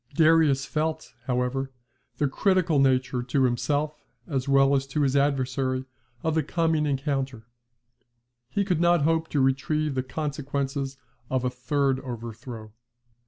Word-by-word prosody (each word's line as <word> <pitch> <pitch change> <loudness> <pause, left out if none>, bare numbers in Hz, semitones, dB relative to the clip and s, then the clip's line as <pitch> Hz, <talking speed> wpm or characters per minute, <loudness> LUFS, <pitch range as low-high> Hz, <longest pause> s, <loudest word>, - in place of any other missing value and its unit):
Darius 155 -4 +4
felt, 155 -4 -2
however, 125 +1 -1 0.5
the 145 - +2
critical 180 0 +2
nature 130 -2 +2
to 130 +2 +1
himself 145 +5 0 0.2
as 135 0 -2
well 135 0 +5
as 135 0 0
to 150 +3 -1
his 135 -1 +1
adversary 130 -2 +1 0.4
of 160 - +1
the 160 - +2
coming 160 0 +1
encounter. 135 -4 -2 1.0
He 200 +8 0
could 180 -4 0
not 175 -3 +4
hope 160 +1 +2
to 145 - 0
retrieve 140 +3 +1
the 130 - 0
consequences 140 0 -3 0.3
of 130 -1 0
a 125 - 0
third 130 +1 0
overthrow. 120 -3 -8
135 Hz, 135 wpm, -26 LUFS, 130-155 Hz, 1.0 s, well